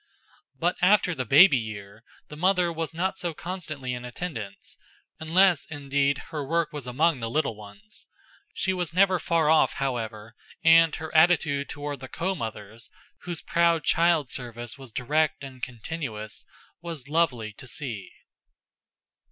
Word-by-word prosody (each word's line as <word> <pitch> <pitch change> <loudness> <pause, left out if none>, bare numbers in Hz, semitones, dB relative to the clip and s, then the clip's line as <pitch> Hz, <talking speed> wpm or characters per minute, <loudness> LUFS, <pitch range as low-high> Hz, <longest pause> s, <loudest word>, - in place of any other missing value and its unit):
But 175 +5 0
after 185 0 +4
the 130 -5 -3
baby 145 - +7
year 105 -1 -8 0.2
the 150 - -9
mother 180 +1 +2
was 165 -1 -3
not 185 +4 -2
so 175 -4 -3
constantly 155 -8 -5
in 125 0 -6
attendance, 120 - -6 0.4
unless, 175 +1 +3
indeed, 140 -1 0
her 150 -2 -3
work 165 +3 -1
was 145 -4 -6
among 145 +4 +2
the 115 -1 -3
little 145 -3 0
ones. 155 - -14 0.4
She 190 - -1
was 175 -3 -3
never 185 -1 +4
far 165 -3 +1
off, 160 0 +4
however, 115 -5 -4 0.3
and 165 -1 +6
her 160 0 -7
attitude 155 -4 +3
toward 145 -1 -5
the 130 - -8
co 185 +8 -2
mothers, 110 - -7 0.4
whose 175 -2 -4
proud 170 -1 +2
child 165 -5 +2
service 120 -2 -5
was 135 -3 -12
direct 145 +5 0
and 130 -2 -10
continuous, 115 -4 -6 0.4
was 165 -6 -6
lovely 130 -9 0
to 130 - -12
see. 115 -7 -6
150 Hz, 145 wpm, -26 LUFS, 125-170 Hz, 0.4 s, baby